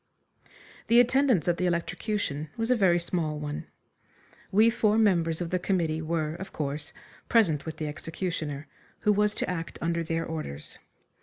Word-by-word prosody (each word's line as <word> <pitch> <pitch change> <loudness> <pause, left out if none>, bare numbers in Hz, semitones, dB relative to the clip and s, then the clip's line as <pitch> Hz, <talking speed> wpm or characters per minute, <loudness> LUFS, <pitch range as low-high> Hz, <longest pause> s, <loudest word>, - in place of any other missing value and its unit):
The 235 +1 +6
attendance 245 - +4
at 175 -1 +2
the 180 - +1
electrocution 170 -2 -2
was 225 +2 0
a - - +6
very 190 -6 +4
small 170 -3 -2
one. 150 0 -5 0.8
We 220 +4 +5
four 215 -2 +2
members 170 -6 +2
of 170 - -3
the 185 - +1
committee 165 -4 0
were, 155 -1 -1
of 190 +3 -7
course, 150 0 -4 0.4
present 165 -11 +3
with 160 - -5
the 155 - -3
executioner, 155 -1 -4 0.3
who 210 - +4
was 210 +1 +2
to - - -1
act 165 -2 -4
under 170 0 0
their 165 0 -1
orders. 155 - -6
170 Hz, 160 wpm, -28 LUFS, 155-205 Hz, 0.8 s, The